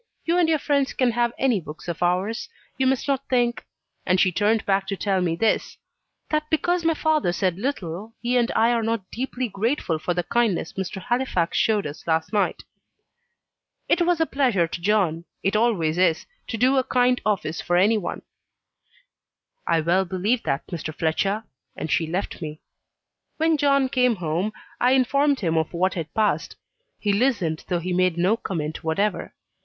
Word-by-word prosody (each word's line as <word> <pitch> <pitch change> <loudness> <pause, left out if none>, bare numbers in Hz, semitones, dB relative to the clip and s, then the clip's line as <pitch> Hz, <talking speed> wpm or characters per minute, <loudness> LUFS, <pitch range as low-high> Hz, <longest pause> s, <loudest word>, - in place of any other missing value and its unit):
You 335 - +2
and 335 -2 +3
your 315 - +3
friend 280 -2 +1
can 255 -2 +3
have 240 0 +1
any 250 -7 +2
books 155 +1 -10
of 170 -1 -4
ours. 185 +6 0 0.3
You 265 - +1
must 265 +1 0
not 275 -1 -1
think" 240 -3 +1 0.4
and 185 0 +2
she 185 - +4
turned 210 +4 +1
back 195 -1 +1
to 195 - -2
tell 195 -2 0
me 170 -2 0
this 220 +5 0 0.5
"that 305 0 0
because 350 +2 +1
my 330 -1 +2
father 310 - +1
said 180 0 -1
little 210 - -4
he 245 +1 -1
and 240 -1 +3
I 230 +2 +4
are 235 -1 +1
not 225 -4 -2
deeply 255 +1 -3
grateful 205 - -1
for 175 +2 -2
the 175 - 0
kindness 210 -3 0
Mr. 190 +1 -4
Halifax 240 -6 -1
showed 215 -2 +2
us 150 +3 -8
last 160 +4 0
night." 205 - 0 1.2
"It 350 - +2
was 345 -1 +2
a 325 - +3
pleasure 245 - +1
to 170 - -6
John 180 -4 +1 0.2
it 195 +2 +1
always 185 -8 +1
is 170 -3 +2 0.2
to 230 - -3
do 260 +4 +3
a 260 - +3
kind 250 -1 +2
office 190 -7 -1
for 175 - +1
any 210 +4 +4
one." 175 - -5 1.4
"I 165 - +3
well 175 +4 +2
believe 195 +7 0
that, 135 +1 -2
Mr. 155 -3 -6
Fletcher." 195 +7 0 0.3
And 160 - -4
she 165 - +1
left 180 +3 -3
me. 155 -1 -6 0.8
When 320 0 +3
John 275 -2 +3
came 250 -2 +2
home 175 +3 -1 0.3
I 250 +2 +4
informed 280 +2 +2
him 165 -4 0
of 160 - -3
what 185 +2 +1
had 165 -3 -5
passed. 215 -1 0 0.4
He 205 -1 +1
listened, 200 -9 0
though 180 - 0
he 180 +2 -3
made 180 -1 +2
no 185 +5 +3
comment 160 -8 -4
whatever. 195 +7 -1
205 Hz, 180 wpm, -24 LUFS, 175-250 Hz, 1.4 s, she